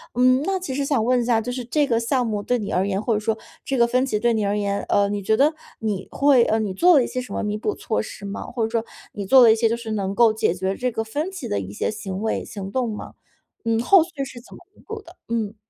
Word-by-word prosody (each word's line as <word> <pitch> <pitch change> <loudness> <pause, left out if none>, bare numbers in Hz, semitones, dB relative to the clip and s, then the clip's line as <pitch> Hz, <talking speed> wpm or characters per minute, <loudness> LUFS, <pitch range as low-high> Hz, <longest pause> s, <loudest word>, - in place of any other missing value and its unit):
嗯， 255 +1 +4
那 385 -1 0
其 315 -8 -5
实 280 - 0
想 270 -6 +1
问 250 +1 +2
一 - - -2
下 235 -2 +3
就 245 - -4
是 250 0 -4
这 290 +4 +1
个 230 -2 +2
项 250 +2 0
目 210 -2 -2
对 245 -1 0
你 205 - -4
而 190 +2 +1
言， 195 0 -1
或 230 - 0
者 210 - +1
说 220 +1 -1 0.3
这 270 - -2
个 235 -1 +4
分 255 +2 +2
歧 210 -5 -1
对 235 0 +2
你 215 -2 0
而 205 +1 0
言， 200 -1 -1
呃， 200 0 +3
你 205 0 -2
觉 220 +2 +2
得 300 +3 +4 0.3
你 210 -4 -3
会 275 -4 +4
呃， 220 -1 +1
你 205 -3 -2
做 350 - +5
了 255 - +4
一 - - -3
些 255 - -3
什 250 - -9
么 - - -2
弥 210 0 -2
补 415 - -2
措 - - -2
施 200 - -9
吗？ 200 +1 -5
或 240 -2 -3
者 220 - 0
说 230 0 -1 0.3
你 200 - -5
做 260 +6 +7
了 230 - +8
一 220 - +5
些 225 0 +2
就 230 - +1
是 230 -2 -6
能 195 -2 -2
够 230 -1 +5
解 215 -5 +1
决 190 +1 -2
这 250 +2 -1
个 225 - -2
分 295 +11 -3
歧 380 - -6
的 100 - -1
一 95 0 -6
些 - - -1
行 200 -2 -5
为、 220 - -1
行 195 -1 -7
动 250 -4 -1
吗？ 210 - -7 0.5
嗯， 230 -1 +1
后 370 +5 +6
续 320 -5 -6
是 250 -2 -10
怎 - - -16
么 - - -13 0.2
弥 - - -20
补 440 -1 -6
的？ 360 -3 -16
嗯。 225 -2 -2
230 Hz, 320 characters per minute, -23 LUFS, 210-255 Hz, 0.5 s, 了